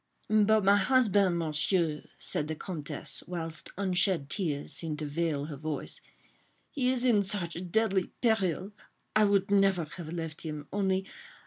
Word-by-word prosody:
." -, -, -36 dB
"But 215 Hz, 0 st, +4 dB
my 200 Hz, +1 st, +6 dB
husband, 205 Hz, -5 st, +3 dB
Monsieur," 160 Hz, 0 st, +1 dB, 0.2 s
said 150 Hz, -, -2 dB
the 160 Hz, -, -3 dB
Comtesse, 155 Hz, -3 st, -6 dB
whilst 165 Hz, -2 st, -3 dB
unshed 185 Hz, -5 st, +1 dB
tears 150 Hz, -6 st, -2 dB
seemed 160 Hz, -3 st, 0 dB
to 155 Hz, -, -4 dB
veil 150 Hz, -1 st, -1 dB
her 150 Hz, -1 st, -6 dB
voice, 155 Hz, +1 st, -4 dB, 0.7 s
"he 255 Hz, -3 st, +1 dB
is 255 Hz, -1 st, +1 dB
in 225 Hz, -5 st, +5 dB
such 180 Hz, -3 st, -3 dB
deadly 195 Hz, -2 st, +2 dB, 0.2 s
peril—I 210 Hz, 0 st, 0 dB
would 200 Hz, 0 st, +2 dB
never 195 Hz, -4 st, +3 dB
have 165 Hz, -3 st, -7 dB
left 165 Hz, -2 st, -5 dB
him, 150 Hz, -2 st, -5 dB
only 190 Hz, -1 st, +1 dB
185 Hz, 145 wpm, -30 LUFS, 160-200 Hz, 0.7 s, my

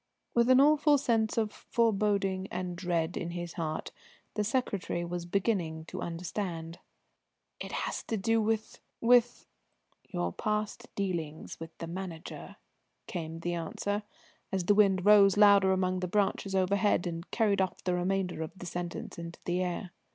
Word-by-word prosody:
With 235 Hz, +1 st, +3 dB
an 255 Hz, 0 st, +7 dB
awful 295 Hz, +1 st, +5 dB
sense 230 Hz, -6 st, +1 dB
of 220 Hz, -2 st, +1 dB
foreboding 200 Hz, -4 st, +1 dB
and 180 Hz, 0 st, -4 dB
dread 170 Hz, -1 st, -1 dB
in 170 Hz, -, -3 dB
his 175 Hz, -1 st, -5 dB
heart, 155 Hz, -2 st, -3 dB, 0.4 s
the 210 Hz, -, 0 dB
secretary 200 Hz, -6 st, -1 dB
was 175 Hz, 0 st, -4 dB
beginning 175 Hz, -5 st, 0 dB
to -, -, -6 dB
understand. 170 Hz, -1 st, -4 dB, 0.8 s
"It -, -, -6 dB
has -, -, -2 dB
to 225 Hz, -, -1 dB
do 225 Hz, +3 st, +2 dB
with 220 Hz, 0 st, -1 dB, 0.2 s
with 240 Hz, 0 st, +4 dB, 0.3 s
?" -, -, -38 dB
"Your 85 Hz, 0 st, -1 dB
past 215 Hz, -, -2 dB
dealings 170 Hz, -6 st, -3 dB
with 165 Hz, 0 st, -9 dB
the 165 Hz, -, -5 dB
Manager," 170 Hz, -1 st, -7 dB, 0.5 s
came 165 Hz, -2 st, -5 dB
the 175 Hz, +1 st, -1 dB
answer, 200 Hz, +5 st, -2 dB, 0.5 s
as 190 Hz, -2 st, 0 dB
the 205 Hz, -, +5 dB
wind 195 Hz, -3 st, +4 dB
rose 205 Hz, -2 st, +7 dB
louder 200 Hz, -2 st, +7 dB
among 185 Hz, -1 st, +1 dB
the 180 Hz, -, -2 dB
branches 195 Hz, 0 st, 0 dB
overhead 190 Hz, 0 st, +2 dB
and 170 Hz, 0 st, -5 dB
carried 205 Hz, -4 st, +2 dB
off 190 Hz, -, -2 dB
the 180 Hz, -, 0 dB
remainder 180 Hz, -1 st, -1 dB
of 160 Hz, +4 st, -6 dB
the 180 Hz, -, -8 dB
sentence 175 Hz, -1 st, -5 dB
into 170 Hz, 0 st, -7 dB
the 180 Hz, +1 st, 0 dB
air. 180 Hz, +1 st, -3 dB
190 Hz, 160 wpm, -30 LUFS, 175-210 Hz, 0.8 s, an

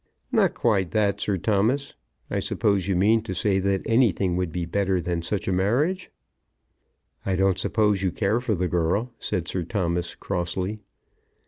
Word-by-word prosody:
"Not -, -, +3 dB
quite 100 Hz, -6 st, +1 dB
that, 100 Hz, -1 st, +1 dB
Sir 100 Hz, -2 st, 0 dB
Thomas. 110 Hz, +9 st, +1 dB, 0.4 s
I -, -, 0 dB
suppose 100 Hz, -3 st, 0 dB
you 95 Hz, -, +1 dB
mean 110 Hz, +5 st, +4 dB
to 105 Hz, -4 st, -5 dB
say 95 Hz, +1 st, +1 dB
that 95 Hz, 0 st, 0 dB
anything 110 Hz, -6 st, +2 dB
would 90 Hz, -2 st, -1 dB
be 90 Hz, 0 st, -3 dB
better 95 Hz, +1 st, 0 dB
than 85 Hz, -1 st, -2 dB
such 105 Hz, +5 st, -2 dB
a -, -, +1 dB
marriage?" 135 Hz, -, +1 dB, 1.1 s
"I 95 Hz, -, 0 dB
don't 95 Hz, 0 st, +2 dB
suppose 105 Hz, -1 st, +1 dB
you 95 Hz, -2 st, +1 dB
care 105 Hz, +5 st, +1 dB
for 120 Hz, -4 st, -1 dB
the 90 Hz, 0 st, 0 dB
girl," 90 Hz, +8 st, 0 dB
said 90 Hz, -2 st, -2 dB
Sir 95 Hz, -, -2 dB
Thomas, 85 Hz, -1 st, -2 dB
crossly. 95 Hz, +3 st, -3 dB
95 Hz, 165 wpm, -25 LUFS, 90-110 Hz, 1.1 s, mean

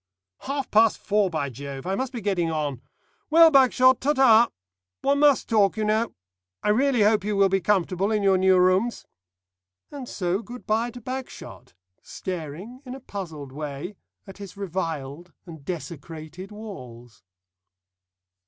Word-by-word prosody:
"Half 275 Hz, 0 st, -4 dB
past 220 Hz, 0 st, +4 dB
four, 205 Hz, -1 st, +1 dB
by 145 Hz, -5 st, -3 dB
Jove! 135 Hz, +1 st, -8 dB
I 190 Hz, -, -1 dB
must 260 Hz, +5 st, -2 dB
be 240 Hz, -3 st, -6 dB
getting 190 Hz, -5 st, 0 dB
on. 145 Hz, -5 st, -3 dB, 0.5 s
Well, 325 Hz, +1 st, +7 dB
Bagshot, 260 Hz, -2 st, +5 dB
ta 290 Hz, +3 st, +2 dB
ta. 240 Hz, -4 st, +5 dB, 0.5 s
One 280 Hz, +1 st, +2 dB
must 290 Hz, -2 st, +4 dB
talk, 210 Hz, -2 st, +2 dB
you 215 Hz, -, -1 dB
know. 220 Hz, +2 st, 0 dB, 0.5 s
I -, -, +1 dB
really 245 Hz, +1 st, +3 dB
hope 210 Hz, -1 st, +3 dB
you 210 Hz, 0 st, -1 dB
will 195 Hz, -1 st, +4 dB
be 195 Hz, 0 st, +1 dB
comfortable 190 Hz, 0 st, +1 dB
in 210 Hz, -2 st, 0 dB
your 190 Hz, -1 st, +4 dB
new 190 Hz, 0 st, +4 dB
rooms." 185 Hz, +6 st, +2 dB, 0.9 s
And 275 Hz, -4 st, -8 dB
so 185 Hz, +1 st, -1 dB
good 240 Hz, +3 st, -11 dB
bye 225 Hz, +3 st, 0 dB
to 245 Hz, +1 st, -11 dB
Bagshot, 250 Hz, -, -8 dB, 0.3 s
staring 185 Hz, -, -7 dB
in 255 Hz, -1 st, -7 dB
a -, -, -9 dB
puzzled 160 Hz, -, -7 dB
way 150 Hz, +6 st, -6 dB, 0.3 s
at 195 Hz, 0 st, -12 dB
his 200 Hz, -1 st, -10 dB
reviled 165 Hz, -4 st, -5 dB
and 160 Hz, -5 st, -11 dB
desecrated 165 Hz, +2 st, -7 dB
walls. 125 Hz, -, -11 dB
195 Hz, 155 wpm, -25 LUFS, 165-235 Hz, 0.9 s, Well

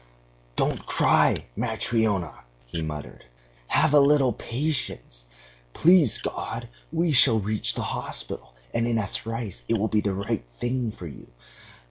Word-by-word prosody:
"Don't -, -, 0 dB
cry, -, -, +3 dB
Matryona,..." 105 Hz, -8 st, 0 dB, 0.3 s
he 70 Hz, +7 st, -5 dB
muttered. 75 Hz, -4 st, -6 dB, 0.4 s
"Have -, -, +2 dB
a 145 Hz, -, +8 dB
little 140 Hz, -3 st, +4 dB
patience. 125 Hz, -, -4 dB, 0.5 s
Please 170 Hz, -, +5 dB
God -, -, -5 dB, 0.2 s
we 170 Hz, 0 st, +1 dB
shall 120 Hz, -4 st, +7 dB
reach 105 Hz, +1 st, +1 dB
the -, -, -2 dB
hospital, -, -, -5 dB, 0.2 s
and 115 Hz, -, 0 dB
in 120 Hz, -1 st, +1 dB
a 105 Hz, -3 st, -1 dB
trice 115 Hz, -, -4 dB
it 115 Hz, -, +1 dB
will 110 Hz, +1 st, 0 dB
be 105 Hz, -, +2 dB
the 100 Hz, -2 st, -1 dB
right 100 Hz, +2 st, -2 dB, 0.2 s
thing 120 Hz, -2 st, -1 dB
for 90 Hz, -, -10 dB
you.... 75 Hz, -, -10 dB
110 Hz, 140 wpm, -25 LUFS, 95-125 Hz, 0.5 s, a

